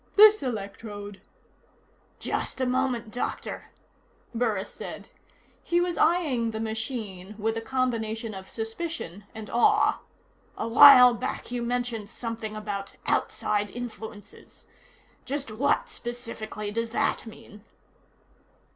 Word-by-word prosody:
"This 430 +1 +8
electrode 205 -3 -6 0.5
" - - -36
"Just - - -2
a 260 - +2
moment, 250 -3 0
Doctor," 245 - -4 0.6
Burris 225 -5 -1
said. - - -8 0.5
He 345 -1 +1
was 350 -1 0
eyeing 300 -9 +2
the 220 -1 -4
machine 220 -4 -4
with 220 +1 -1
a 225 - -2
combination 225 -3 -1
of 190 -1 -9
suspicion 225 - -5
and 220 -1 -7
awe. 420 - +4 0.6
"A - - -2
while 250 +1 +10
back 235 - -4
you 245 -1 -2
mentioned 235 -3 -2
something 230 -2 -5
about 205 -2 -5
'outside 210 -1 0
influences.' 220 -2 -9 0.6
Just 275 -3 -3
what, 265 +7 +1
specifically, 230 -3 -6
does 230 +2 -2
that 230 - 0
mean?" 210 -1 -13
225 Hz, 115 wpm, -27 LUFS, 215-250 Hz, 0.6 s, while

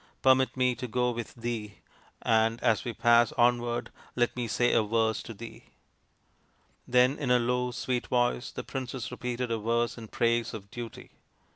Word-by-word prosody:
Permit 130 0 +4
me 125 -1 +3
to 125 - -6
go 125 +1 +1
with 120 -2 -6
thee, 115 -3 -4 0.5
and 115 +1 +2
as 110 -2 +3
we 120 - -3
pass 120 0 +4
onward 120 0 +1 0.2
let 120 -1 +1
me 120 -1 -2
say 120 +2 +2
a - - +5
verse 110 +1 +1
to - - -9
thee." 115 +1 -10 1.2
Then 125 +3 +3
in 135 - -2
a 125 - +6
low 125 +1 0
sweet 125 0 -2
voice 120 0 +1
the - - -6
princess 130 -2 -5
repeated 125 -1 -3
a 115 - 0
verse 115 +2 0
in 110 - -9
praise 115 +1 0
of 100 -2 -10
Duty. 120 -2 -8
120 Hz, 170 wpm, -29 LUFS, 115-125 Hz, 1.2 s, a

